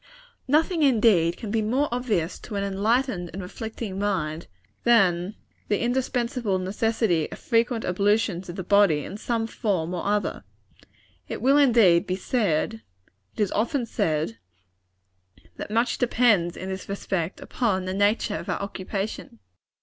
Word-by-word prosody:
Nothing, 320 +5 +2
indeed, 215 - +4
can 215 - -6
be 225 0 +1
more 255 +7 +1
obvious 220 -9 -1
to 215 - -8
an 200 - -1
enlightened 200 -1 0
and 195 - -5
reflecting 215 +1 -6
mind, 170 -6 -2 0.4
than 195 -4 +3 0.3
the 205 - +1
indispensable 245 -3 0
necessity 195 -2 0
of - - -7
frequent 230 -1 0
ablutions 200 -1 +1
of 175 - -6
the 190 - -4
body 195 -7 +3
in 195 - -7
some 225 +1 -1
form 190 -7 -2
or 175 - -3
other. 205 +1 -1 0.8
It - - -5
will, 275 +3 +4
indeed, 215 -10 +5
be 185 - 0
said 215 0 -1 0.5
it - - -14
is 205 -3 +1
often 240 +4 0
said 155 - -1 1.2
that - - -6
much 230 +3 +1
depends, 225 -8 +2
in 190 - -6
this 190 0 -6
respect, 190 -3 -3
upon 195 -7 -1
the 185 - -3
nature 205 +2 +1
of - - -7
our - - -1
occupation. 195 - -5
205 Hz, 145 wpm, -25 LUFS, 185-235 Hz, 1.2 s, indeed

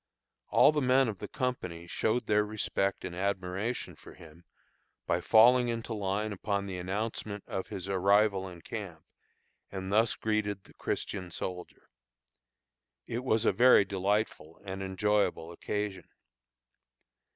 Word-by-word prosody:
All - - +6
the 150 -1 0
men 130 0 +4
of 105 -4 -4
the - - -5
company 90 -10 -3
showed 110 +6 0
their 105 0 +3
respect 105 -2 -2
and 85 - -6
admiration 95 +4 -2
for - - -14
him 85 -1 -15 0.6
by 85 - 0
falling 120 +5 +6
into 115 0 -3
line 105 +1 -2
upon 100 0 -2
the 95 -2 -5
announcement 100 +2 -3
of 95 - -4
his 95 0 -6
arrival 100 0 +2
in 85 -2 -12
camp, 95 -8 -7 0.7
and 95 0 -5
thus 110 +2 +3
greeted 105 -2 -1
the - - -19
Christian 95 -3 -3
soldier. 90 0 -6 1.2
It 120 +2 -4
was 115 -3 +1
a - - +5
very 120 -1 +6
delightful 100 -4 -1
and 95 0 -5
enjoyable 95 -3 0
occasion. 100 0 -4
100 Hz, 135 wpm, -30 LUFS, 95-110 Hz, 1.2 s, All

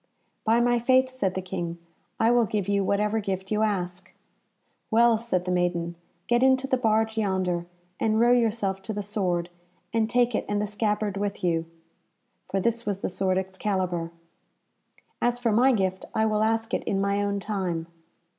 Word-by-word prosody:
"By 225 +1 +3
my 240 0 +3
faith," 260 +2 +3
said 205 -8 -2
the 190 - -3
King, 170 -2 -4 0.4
"I 225 +1 +4
will 240 -2 +4
give 200 -1 -2
you 200 -1 +2
whatever 210 +3 +1
gift 190 -1 -4
you 215 0 +1
ask." 185 -3 -2 0.8
"Well," 230 0 +4
said 185 -6 -1
the 180 - -1
maiden, 175 -1 0 0.3
"get 240 0 +2
into 260 0 +4
the 270 - +1
barge 220 -2 +1
yonder, 185 -4 0 0.3
and 220 0 +2
row 240 +1 +5
yourself 220 -5 +1
to 195 +3 -5
the 205 0 -3
sword, 180 -4 -1 0.4
and 225 -1 +1
take 245 0 +2
it - - -1
and 205 0 0
the 210 - 0
scabbard 210 -1 -1
with 205 0 -3
you." 165 -2 +1 0.8
For 195 - 0
this 235 +4 0
was 200 -2 -3
the - - -1
sword 185 0 0
Excalibur. 185 -3 -2 1.1
"As 240 0 +2
for 240 -2 0
my 245 +5 +5
gift, 190 -5 0
I 220 - +3
will 215 -1 +1
ask 225 +1 0
it - - 0
in 195 - 0
my 200 +1 +1
own 200 0 -1
time." 185 -5 -2
205 Hz, 180 wpm, -26 LUFS, 190-225 Hz, 1.1 s, row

